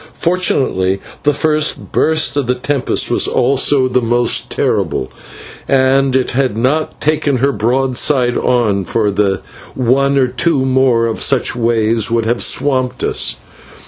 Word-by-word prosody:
Fortunately 130 - 0 0.2
the 145 - +2
first 155 +1 -1
burst 155 -1 +1
of 140 -4 -1
the 125 - +1
tempest 135 +1 -2
was - - +2
also 135 +1 +2
the 125 0 0
most 120 0 0
terrible, 65 - -2 0.6
and 135 0 +2
it 130 -1 0
had 130 -4 -1
not 140 +7 -1
taken 145 -2 0
her 140 +3 +1
broadside 125 +2 0
on, 110 -6 0
for 105 +2 -1 0.6
one 135 +2 +1
or 135 - +3
two 130 +2 0
more 125 -4 +1
such 135 -4 +1
waves 115 -2 0
would 115 -1 0
have 120 +1 -1
swamped 130 -3 0
us. - - 0
130 Hz, 135 wpm, -14 LUFS, 115-140 Hz, 0.6 s, or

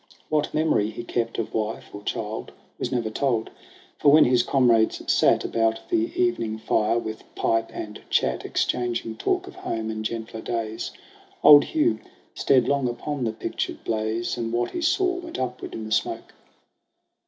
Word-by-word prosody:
What 150 -1 +1
memory 155 -9 +2
he 115 +2 -7
kept 115 -1 -2
of 115 - -3
wife 110 0 -3
or 100 - -7
child 110 +1 -4 0.3
Was 125 - -2
never 120 -4 -1
told; 120 -2 0 0.5
for 145 - +5
when 155 +1 +7
his 125 -1 +4
comrades 120 -4 +3
sat - - +3
About 115 0 +1
the 340 0 +1
evening 115 - +1
fire 110 +1 +1
with 110 -1 -4
pipe 115 0 +1
and 105 -1 -7
chat, - - +1
Exchanging 120 -2 -1
talk - - 0
of - - -10
home 110 -1 -3
and 110 0 -4
gentler 110 0 -4
days, 115 -1 -3 0.5
Old 145 -1 +9
Hugh 320 +2 +1 0.3
stared 130 -3 +3
long 140 -3 +1
upon 130 +2 -3
the 110 - 0
pictured 110 - -4
blaze, 110 +2 -1
And 115 -1 -2
what 120 +1 0
he 345 - -4
saw 365 +2 +2
went 345 -2 -7
upward 125 -1 -4
in 110 - -5
the 110 - -8
smoke. 110 - -1
115 Hz, 165 wpm, -25 LUFS, 110-135 Hz, 0.5 s, Old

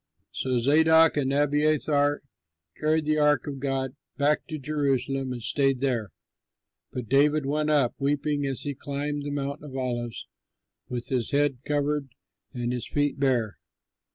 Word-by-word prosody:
'" - - -47
So 130 -1 -1
Zadok 160 +5 +5
and 135 -2 0
Abiathar 145 0 +2 0.5
carried 155 0 +1
the 155 0 +2
ark 150 -3 +3
of 140 -2 -5
God 135 -1 -2 0.2
back 150 +1 +1
to 155 - -4
Jerusalem 135 -2 -1
and 120 -2 -5
stayed 135 -1 +1
there. 120 -6 -1 0.8
But 125 -3 -5
David 145 +3 +3
went 150 +2 0
up, 140 -6 +3
weeping 145 +1 0
as 135 -2 -2
he 145 - -3
climbed 145 +2 -3
the 145 - -4
Mount 140 0 -3
of 135 -3 -7
Olives 120 -3 -3 0.6
with 120 -1 -3
his 125 -4 0
head 140 -2 +1
covered 145 -1 0 0.4
and 120 -2 -2
his 125 -2 -4
feet 145 -1 0
bare. 125 -6 +1
140 Hz, 155 wpm, -26 LUFS, 130-150 Hz, 0.8 s, Zadok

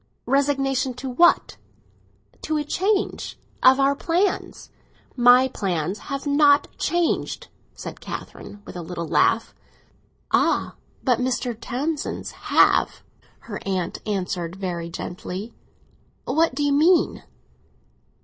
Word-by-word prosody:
"Resignation 270 -1 +1
to 255 +1 -5
what?" 345 +7 +3 0.8
"To 310 - -1
a 300 - -1
change 385 +7 -1 0.2
of—of 260 +1 +6
our 275 +1 +3
plans." 355 +6 -1 0.4
"My 245 +1 +6
plans 185 -5 -2
have 275 +1 -4
not 285 0 +4
changed!" 345 +1 -1 0.3
said - - -8
Catherine, 205 0 -8
with - - -10
a 175 - -5
little 170 0 -5
laugh. 225 +8 +2 0.8
"Ah, - - +2 0.3
but 250 -3 +2
Mr. 250 -1 -1
Townsend's 270 +7 -3 0.2
have," - - +3 0.4
her 205 -3 -7
aunt 185 -3 -2
answered 180 -4 -2
very 175 -3 -4
gently. 185 +5 -6 0.7
"What 320 -3 +1
do 290 - -1
you 285 -1 +2
mean?" 330 +5 +3
255 Hz, 110 wpm, -23 LUFS, 195-290 Hz, 0.8 s, of—of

